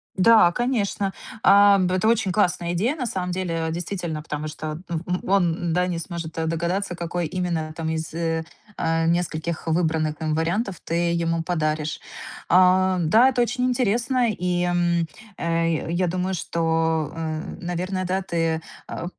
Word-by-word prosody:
Да, 205 -2 +6
конечно, 205 -4 -1 0.3
а, 200 0 +7
б 185 -1 +1
это 185 +4 +1
очень 225 -4 +2
классная 175 -3 +1
идея, 225 - +1
на 265 -6 -3
самом 185 -5 -2
деле, 170 -3 -2
действительно, 170 -2 -4
потому 150 -1 -4
что, 155 0 -5
д 160 - -9
б 160 - -3
м, 180 0 -2
он 175 -3 +2
да 180 +1 +2
не 175 -2 -2
сможет 170 -1 -5
догадаться, 170 +4 -1
какой 175 0 -3
именно 170 -2 -2
там 160 -1 -3
из, 160 0 -3 0.6
а, 165 0 +1
нескольких 170 -1 -1
выбранных 160 -2 0
им 155 -1 0
вариантов 175 +5 -1
ты 170 +1 0
ему 165 -1 0
подаришь. 155 -2 -1 0.5
А, 185 +1 +5
да, 220 +10 +5
это 245 -2 +2
очень 250 +1 -1
интересно, 245 0 +1
и, 180 -2 -1
м, 175 -1 +1 0.3
э, 165 -1 0
я 180 +1 +1
думаю, 185 +2 -1
что, 160 -3 0
э, 160 -1 -3 0.2
наверное, 185 +2 -2
да, 185 +2 0
ты, 165 -2 -1 0.3
э, 165 - -5
175 Hz, 155 wpm, -24 LUFS, 165-190 Hz, 0.6 s, а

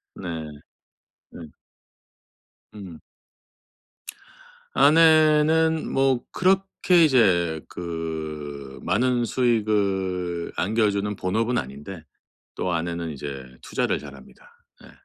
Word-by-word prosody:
네. 90 - -8 1.1
예. 80 -3 -10 1.2
음. 95 -6 -10 1.7
아내는 160 0 +4
뭐 135 -2 +1
그렇게 185 -2 +2
이제 90 - +3
그 80 -5 -6
많은 125 +1 +1
수익을 100 -8 -1
안겨주는 105 -1 0
본업은 110 +7 -1
아닌데 75 +6 -7 0.5
또 90 - -2
아내는 85 0 -3
이제 70 -2 -7 0.2
투자를 - - -1
잘 70 -2 -11
합니다. 65 -1 -17 0.3
예. - - -14
95 Hz, 165 characters per minute, -24 LUFS, 80-130 Hz, 1.7 s, 아내는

